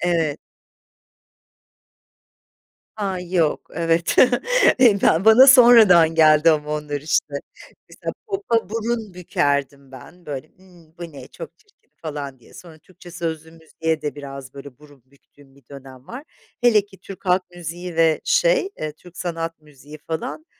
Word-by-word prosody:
Evet. 165 -4 -1 2.6
Ha, 195 -4 -3
yok. 175 -4 -1
Evet, 165 +1 0 0.6
eee, 230 -6 +5
ben 170 +6 +2
bana 240 +5 +7
sonradan 220 - +7
geldi 155 0 +5
ama 150 -1 -2
onlar, 150 -1 -4
işte. 150 -1 -1 0.6
Mesela - - -7
popa 390 - -2
burun 225 -2 -4
bükerdim 140 -5 -2
ben. 170 +7 -15
Böyle, 145 +1 -7
ımm, 175 -3 -22
"Bu 170 -2 -9
ne! 140 - -12
Çok - - -11
çirkin!" 420 -1 -34
falan 145 -4 -7
diye. 115 - -21
Sonra 165 -3 -14
Türkçe 180 0 -16
sözlü 160 -2 -6
müziğe 160 -1 -4
de 150 -1 -5
biraz, 135 -2 -10
böyle, 140 -2 -12
burun 145 -4 -19
büktüğüm 140 0 -24
bir 140 - -23
dönem 135 -2 -13
var. 255 +4 -9 0.4
Hele 220 -4 +3
ki 195 -2 -19
Türk 195 0 -12
halk 180 +1 +2
müziği 175 +1 -7
ve 160 -1 +2
şey, - - +2
eee, 155 - -4
Türk 180 +2 -18
sanat 165 -3 -5
müziği 150 0 -15
falan 160 - -6
165 Hz, 145 wpm, -21 LUFS, 150-185 Hz, 2.6 s, bana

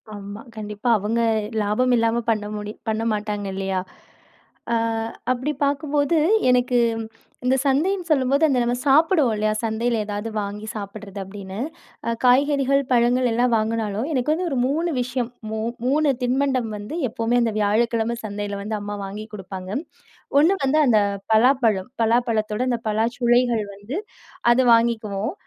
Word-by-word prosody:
ஆமா. 205 +2 -8
கண்டிப்பா. 210 +2 -4
அவங்க 220 +4 -1 0.4
லாபம் 245 +5 +1
இல்லாம 230 +1 +1
பண்ண 215 -2 +1
முடியும் 210 0 -7
பண்ண 220 +1 -1
மாட்டாங்க. 210 -1 -3
இல்லையா! 190 -1 -1 0.9
ஆ - - +3 0.6
அப்பிடி 255 +4 -1
பாக்கும்போது, 285 +2 +1 0.3
எனக்கு 250 0 +3 0.2
ம், 225 - -4 0.4
இந்த 260 +1 +3
சந்தைன்னு 345 +7 +1
சொல்லும்போது, 280 +1 +2
அந்த 260 -3 +2
நம்ம 240 +1 0
சாப்பிடுவோம் 300 - +4
இல்லையா? 215 0 +1
சந்தையில 230 +1 0
ஏதாவது 205 +2 -4
வாங்கி 205 +2 -6
சாப்பிடுறது, 200 -1 -7
அப்டின்னு. 195 +1 -8 0.5
அ - - +1
காய்கறிகள், 275 +1 +4
பழங்கள் 245 +1 +3
எல்லாம் 240 +1 +2
வாங்குனாலும், 220 +1 -1
எனக்கு 260 +3 +1
வந்து 355 +2 -2
ஒரு 265 - -1
3 325 +5 0
விஷயம் 245 -1 -3 0.2
மூ 220 - -2 0.3
3 295 +1 +3
தின்பண்டம் 255 -2 +1
வந்து, 210 +11 -6
எப்பவுமே 230 +2 0
அந்த 225 - 0
வியாழக்கிழமை 230 +2 +1
சந்தையில 205 -1 -4
வந்து, 215 +1 -3
அம்மா 205 0 -5
வாங்கி 210 +2 -6
குடுப்பாங்க. 190 -1 -7 0.7
1 325 +6 +5
வந்து 300 +4 +3
அந்த 220 -4 +4 0.3
பலாப்பழம். 225 -4 +3
பலாப்பழத்தோட 225 -1 +1
அந்த 240 -2 0
பலாச்சுளைகள் 240 +1 +2
வந்து 205 +9 -7 0.6
அத 245 - +4
வாங்கிக்குவோம். 225 - +1
230 Hz, 140 wpm, -23 LUFS, 210-255 Hz, 0.9 s, 1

